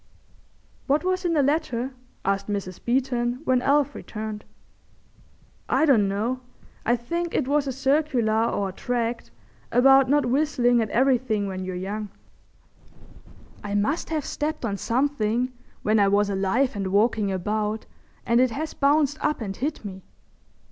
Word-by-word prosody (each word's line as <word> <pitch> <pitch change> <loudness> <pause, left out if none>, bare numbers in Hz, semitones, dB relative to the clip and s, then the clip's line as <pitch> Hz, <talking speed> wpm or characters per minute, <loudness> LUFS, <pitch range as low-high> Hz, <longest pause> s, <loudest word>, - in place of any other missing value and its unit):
"What 290 +4 +2
was 370 0 -1
in 340 - +2
the 295 -3 +3
letter?" 270 -4 0 0.3
asked 195 0 0
Mrs. 200 -3 -4
Beeton, 245 0 0
when 255 -4 +2
Alf 285 +2 +2
returned. 215 -1 -6 1.3
"I - - +3
don't 230 -9 +4
know. 220 +6 -1 0.4
I 240 - +3
think 340 +8 -3
it 270 - +1
was 285 0 +1
a - - 0
circular 265 -5 +1
or 200 -4 -1
a - - -5
tract 235 - -3 0.4
about 270 +2 +6
not 290 +1 +3
whistlin' 245 -2 +2
at 220 - -2
everything 245 -4 +2
when 190 -1 -4
you're 185 0 -4
young." 205 +3 -4 1.5
"I 205 0 -3
must 215 +11 0
have 310 -3 -2
stepped 300 -3 -3
on 205 -3 -1
something 245 0 0 0.3
when 215 +1 +3
I 200 - +5
was 200 +1 +2
alive 200 +7 +1
and 195 -2 -2
walking 205 +1 +2
about 210 +3 -2 0.4
and 235 +1 +3
it 255 - +4
has 300 +7 -4
bounced 290 +1 +2
up 300 - +1
and 200 -4 -4
hit 285 -1 -3
me. 190 -1 -7
240 Hz, 150 wpm, -25 LUFS, 210-280 Hz, 1.5 s, about